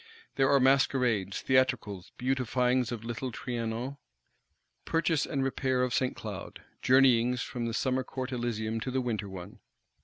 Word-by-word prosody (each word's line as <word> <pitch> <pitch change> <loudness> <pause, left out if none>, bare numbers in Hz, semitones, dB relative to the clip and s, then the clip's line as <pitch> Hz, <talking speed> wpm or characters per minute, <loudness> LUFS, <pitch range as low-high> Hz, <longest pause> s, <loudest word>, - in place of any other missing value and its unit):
There 135 -1 +3
are 140 - +5
masquerades, 125 -7 +2
theatricals; 125 -8 +1
beautifyings 125 -1 +1
of 115 -2 -5
little 120 +2 -4
Trianon, 120 +3 -4 0.9
purchase 165 -2 +1
and 135 -1 -1
repair 130 -1 0
of 125 -1 -1
St. 130 -1 +1
Cloud; - - -7 0.2
journeyings 125 -2 +4
from 120 -2 -4
the 115 - -3
summer 130 0 0
Court 130 0 -5
Elysium 115 -2 -2
to 120 - -4
the 130 +1 0
winter 110 -5 -2
one. 90 -2 -9
125 Hz, 145 wpm, -30 LUFS, 115-130 Hz, 0.9 s, are